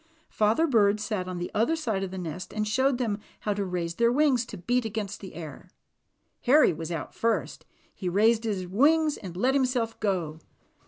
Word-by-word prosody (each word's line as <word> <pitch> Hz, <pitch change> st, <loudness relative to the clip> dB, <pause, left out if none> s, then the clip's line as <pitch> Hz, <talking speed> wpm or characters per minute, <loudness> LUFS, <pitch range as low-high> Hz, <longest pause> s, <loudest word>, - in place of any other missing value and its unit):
Father 220 Hz, +9 st, +2 dB
Bird 215 Hz, -7 st, +3 dB
sat 210 Hz, -3 st, -3 dB
on 185 Hz, -1 st, -4 dB
the 175 Hz, -, -4 dB
other 230 Hz, +10 st, +2 dB
side 225 Hz, -12 st, -2 dB
of 195 Hz, -, -3 dB
the 190 Hz, -, -7 dB
nest 180 Hz, 0 st, -6 dB
and 215 Hz, 0 st, -1 dB
showed 260 Hz, +4 st, +2 dB
them 225 Hz, -4 st, -1 dB, 0.2 s
how 210 Hz, -, 0 dB
to 200 Hz, 0 st, -2 dB
raise 175 Hz, -3 st, -3 dB
their 235 Hz, +6 st, +2 dB
wings 265 Hz, -3 st, +2 dB
to -, -, -8 dB
beat 245 Hz, +8 st, 0 dB
against 210 Hz, -2 st, -4 dB
the 190 Hz, -, -10 dB
air. 165 Hz, +1 st, -9 dB, 0.8 s
Harry 265 Hz, -, +6 dB
was 165 Hz, +1 st, -6 dB
out 160 Hz, -5 st, -5 dB
first; 230 Hz, 0 st, -1 dB, 0.3 s
he 185 Hz, -, -4 dB
raised 220 Hz, +5 st, +3 dB
his 200 Hz, -5 st, -2 dB
wings 300 Hz, -, +3 dB
and 180 Hz, -3 st, -9 dB
let 255 Hz, +7 st, +2 dB
himself 250 Hz, -4 st, 0 dB
go. 175 Hz, -7 st, -1 dB
210 Hz, 195 wpm, -27 LUFS, 185-245 Hz, 0.8 s, Harry